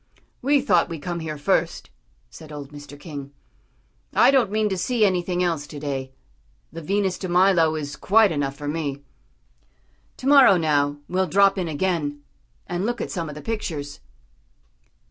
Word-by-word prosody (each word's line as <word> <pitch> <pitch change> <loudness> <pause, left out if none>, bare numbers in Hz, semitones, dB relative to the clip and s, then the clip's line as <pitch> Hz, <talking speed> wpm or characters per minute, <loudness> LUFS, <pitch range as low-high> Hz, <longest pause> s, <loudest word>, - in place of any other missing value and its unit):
"We 280 +2 +3
thought 175 -11 +2
we'd 165 -4 -7
come 175 -1 -3
here 155 -2 -5
first," 145 - -1 0.4
said 155 -1 -12
old 145 -1 -8
Mr. 145 -1 -11
King. 145 -4 -8 0.8
"I - - +6
don't 260 -7 +3
mean 215 +1 +1
to 190 - -1
see 220 +4 +1
anything 180 -1 0
else 165 -5 -1
to 145 - -8
day. 135 -2 -4 0.6
The 165 - -8
Venus 190 +2 -1
de 185 - -4
Milo 175 -3 +4
is 145 -2 -5
quite 215 0 +4
enough 140 -3 -2
for 145 +1 -7
me. 145 -2 -3 1.1
To - - -9
morrow, 270 -9 +7
now, 145 -3 +1
we'll 185 +1 0
drop 195 +1 +4
in 180 - -2
again, 150 -3 -2 0.4
and 175 0 -3
look 235 +2 -2
at - - -4
some 170 -6 -3
of 150 - -8
the 150 - -9
pictures." 160 -11 -4
170 Hz, 165 wpm, -23 LUFS, 145-195 Hz, 1.1 s, morrow